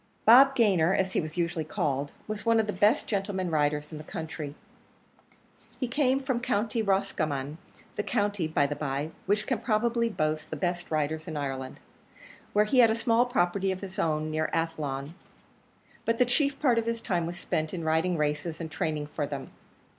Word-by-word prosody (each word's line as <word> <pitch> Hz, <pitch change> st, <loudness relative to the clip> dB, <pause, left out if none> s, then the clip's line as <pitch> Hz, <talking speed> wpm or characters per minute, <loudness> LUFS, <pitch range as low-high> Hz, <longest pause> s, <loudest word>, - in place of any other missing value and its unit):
Bob 270 Hz, +4 st, +8 dB
Gayner, 190 Hz, -7 st, +4 dB
as 190 Hz, -1 st, +1 dB
he -, -, +1 dB
was 155 Hz, +1 st, -7 dB
usually 170 Hz, -2 st, 0 dB
called, 145 Hz, -2 st, -2 dB, 0.2 s
was 215 Hz, -1 st, -4 dB
one 230 Hz, -1 st, +4 dB
of 220 Hz, -, +2 dB
the 210 Hz, -, -3 dB
best 210 Hz, +3 st, +3 dB
gentlemen 195 Hz, -3 st, -2 dB
riders 150 Hz, 0 st, 0 dB
in 155 Hz, -, -7 dB
the -, -, -8 dB
country. 155 Hz, -2 st, -6 dB, 1.2 s
He 255 Hz, -, -1 dB
came 265 Hz, +1 st, +2 dB
from 260 Hz, -3 st, 0 dB
County 230 Hz, -2 st, 0 dB
Roscommon, 155 Hz, -7 st, -1 dB, 0.4 s
the -, -, +1 dB
county, 205 Hz, -6 st, 0 dB
by 150 Hz, -2 st, +2 dB
the 145 Hz, +1 st, -2 dB
by, 145 Hz, +1 st, -3 dB, 0.2 s
which 210 Hz, +2 st, +1 dB
can -, -, -1 dB
probably 235 Hz, +1 st, +1 dB
boast 155 Hz, -6 st, -1 dB
the -, -, -4 dB
best 175 Hz, +3 st, -2 dB
riders 155 Hz, +1 st, -1 dB
in 160 Hz, -3 st, -4 dB
Ireland, 135 Hz, -2 st, -4 dB, 0.7 s
where 210 Hz, +1 st, +4 dB
he 250 Hz, +5 st, +2 dB
had 235 Hz, -2 st, +8 dB
a 220 Hz, -, +2 dB
small 235 Hz, +1 st, +2 dB
property 195 Hz, -4 st, +1 dB
of 185 Hz, -, -4 dB
his 190 Hz, -2 st, -7 dB
own, 155 Hz, -1 st, 0 dB
near 155 Hz, 0 st, 0 dB
Athlone; 150 Hz, -3 st, -2 dB, 0.9 s
but 230 Hz, 0 st, +1 dB
the 250 Hz, -, +4 dB
chief 280 Hz, +3 st, +1 dB
part 250 Hz, -6 st, +3 dB
of 230 Hz, -, -3 dB
his 230 Hz, 0 st, -1 dB
time 175 Hz, -7 st, -1 dB
was 175 Hz, +1 st, -5 dB
spent 155 Hz, -2 st, -2 dB
in 170 Hz, -3 st, -4 dB
riding 160 Hz, +3 st, +1 dB
races 150 Hz, +2 st, -1 dB
and 160 Hz, -2 st, -5 dB
training 155 Hz, -1 st, -2 dB
for 145 Hz, 0 st, -3 dB
them. 140 Hz, -2 st, -6 dB
175 Hz, 190 wpm, -28 LUFS, 155-220 Hz, 1.2 s, Bob